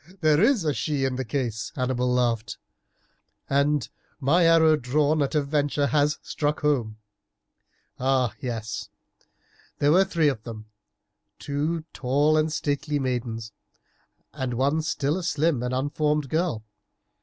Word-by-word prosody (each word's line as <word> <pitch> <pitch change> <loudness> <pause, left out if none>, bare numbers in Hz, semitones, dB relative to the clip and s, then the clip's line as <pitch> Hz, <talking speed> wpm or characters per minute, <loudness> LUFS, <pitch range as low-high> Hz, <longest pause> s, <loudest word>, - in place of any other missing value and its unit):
"Oh! - - -16
there 155 0 +4
is 225 -5 +3
a 150 - +1
she 145 -1 -1
in 130 -1 -1
the 130 - -2
case," 115 -4 -3
Hannibal 125 -1 0
laughed; 120 -4 0 0.9
"and 140 -1 +1 0.3
my 155 +6 +3
arrow 160 -1 +6
drawn 150 +3 +1
at 140 +2 -1
a 150 - +2
venture 145 0 0
has 150 +1 +2
struck 150 0 -2
home. 125 -8 0 1.0
Ah! 130 -2 +1
yes, 115 -4 -5 0.9
there 145 +1 +3
were 185 +4 +6
three 170 -5 +1
of 135 -7 0
them, 110 -2 -8 0.7
two 150 +4 -2
tall 145 +4 +2
and 155 0 +2
stately 150 0 -1
maidens 120 -4 -3 0.8
and 130 -4 -3
one 140 +6 +1
still 150 0 -1
a - - -6
slim 155 -5 +1
and 125 0 -2
unformed 145 +2 0
girl. 155 -9 -1
145 Hz, 140 wpm, -25 LUFS, 125-155 Hz, 1.0 s, arrow